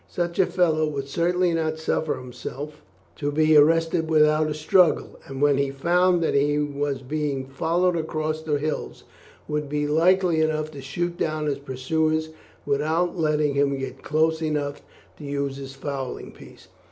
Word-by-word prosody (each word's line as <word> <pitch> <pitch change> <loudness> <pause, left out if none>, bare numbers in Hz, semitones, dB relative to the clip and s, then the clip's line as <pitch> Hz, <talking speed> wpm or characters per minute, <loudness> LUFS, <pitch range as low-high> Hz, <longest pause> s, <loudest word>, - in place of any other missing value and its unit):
Such 175 0 -3
a 190 - +5
fellow 160 -4 +2
would 140 -2 -4
certainly 175 +4 +1
not 160 -1 -1
suffer 160 0 -1
himself 130 +4 -8 0.4
to 145 - -2
be 155 +1 +3
arrested 165 +2 +4
without 155 0 +4
a 150 - -3
struggle, 170 +2 +2
and 135 +1 -4
when 145 -1 +4
he 140 -1 +1
found 175 +5 +2
that - - +1
he 145 +1 +2
was 145 -2 -2
being 145 -1 -2
followed 170 +6 0
across 155 -1 -2
the 155 -2 0
hills, 155 +2 -4 0.4
would 150 -1 -2
be 150 0 -1
likely 170 +2 +3
enough 155 -1 0
to 140 -2 -9
shoot 175 +6 -3
down 155 -1 -1
his 145 -2 -1
pursuer 155 +4 0 0.5
without 155 +5 0
letting 150 -3 +1
him 140 0 +1
get 135 -1 -6
close 160 +1 +1
enough 145 -2 -2 0.4
to - - -10
use 140 -1 -3
his 135 -1 -8
fowling 135 -2 -5
piece. - - -15
155 Hz, 165 wpm, -24 LUFS, 140-160 Hz, 0.5 s, a